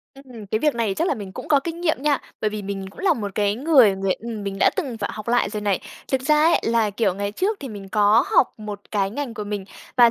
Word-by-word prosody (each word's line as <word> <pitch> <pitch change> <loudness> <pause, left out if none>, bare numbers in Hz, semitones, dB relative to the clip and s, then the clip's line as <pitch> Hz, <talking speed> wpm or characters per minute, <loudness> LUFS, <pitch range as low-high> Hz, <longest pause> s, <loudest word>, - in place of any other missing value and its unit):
Ừm, 250 -6 -11
cái 220 - +1
việc 300 0 +1
này 225 -4 0
chắc 335 - 0
là 295 - +1
mình 200 -4 -8
cũng - - -8
có 285 -2 +5
kinh 335 +3 -5
nghiệm 315 -6 0
nha. 290 -2 +3 0.2
Bởi 215 - +1
vì 210 0 -5
mình 195 -1 -4
cũng - - -19
là 385 -2 +3
một 205 -3 -4
cái 205 -1 +1
người 255 -5 +5
người 195 0 0
ừm, 225 +1 -6
mình 195 -1 -3
đã - - +6
từng 270 -11 -3
phải 205 - -2
học 215 +1 -7
lại 240 -4 +2
rồi 210 0 -4
này. 205 -3 0 0.3
Thực 260 -1 +1
ra 300 +3 +3
ấy, 335 - +4
là, 225 -2 +2
kiểu, 205 -2 0
ngày 200 +1 -3
trước 400 - 0
thì 275 - -6
mình 200 -3 -8
có 210 +4 +4
học - - +4
một 210 -1 -6
cái 195 -2 0
ngành 245 0 -4
của 210 - -5
mình 205 -1 -4 0.3
và 240 -2 +7
220 Hz, 280 wpm, -23 LUFS, 205-270 Hz, 0.3 s, và